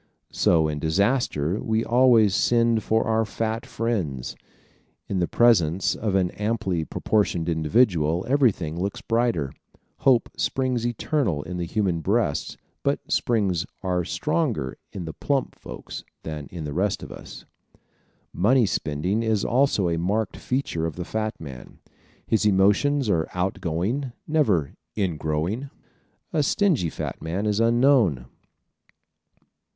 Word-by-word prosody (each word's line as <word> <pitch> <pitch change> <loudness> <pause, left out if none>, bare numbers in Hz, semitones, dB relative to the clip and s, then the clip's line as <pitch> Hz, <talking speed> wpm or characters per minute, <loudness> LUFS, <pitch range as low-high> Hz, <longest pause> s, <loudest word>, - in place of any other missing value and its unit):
So 80 -2 +3
in 75 -1 -3
disaster 90 - +1
we 110 +1 0
always 120 -4 +5
send 115 +1 +3
for 110 +1 +1
our 110 0 +2
fat 110 +1 -3
friends. 90 - -2 0.7
In 95 - -1
the 85 - +1
presence 95 -7 +3
of 105 -3 -2
an 90 -2 +2
amply 105 -6 -1
proportioned 90 -2 0
individual 85 0 +2
everything 100 - +1
looks 100 +1 -3
brighter. 115 - 0 0.4
Hope 130 -3 +3
springs 125 -3 0
eternal 120 - -1
in 90 +1 -6
human 90 0 0
breasts 100 -5 0 0.2
but - - +1
the - - -14
springs 100 -7 +1 0.2
are 90 -2 0
stronger 125 - -1 0.2
in 90 -4 -6
the 80 - -6
plump 140 -2 -1
folks - - -9 0.2
than 75 -3 -6
in 85 -3 -7
the 75 -1 -5
rest 95 +4 0
of - - -9
us. - - -10 0.9
Money 120 +6 +3
spending 90 +4 -1
is 110 -3 0
also 125 -6 +2
a 85 -1 0
marked 100 +4 -1
feature 125 -11 -2
of 80 - -6
the 90 - -5
fat 110 +1 -3
man. 70 -5 -10 0.5
His 110 - +1
emotions 105 +8 +3
are 85 -6 +1
out 90 +2 -1
going, 110 - -2
never 105 - +1 0.2
"in 95 -7 -1
growing." 80 - -2 0.6
A 155 - +2
stingy 150 - +2
fat - - -5
man 90 +6 -2
is 105 0 +1
unknown. 115 - +3
100 Hz, 135 wpm, -24 LUFS, 85-115 Hz, 0.9 s, always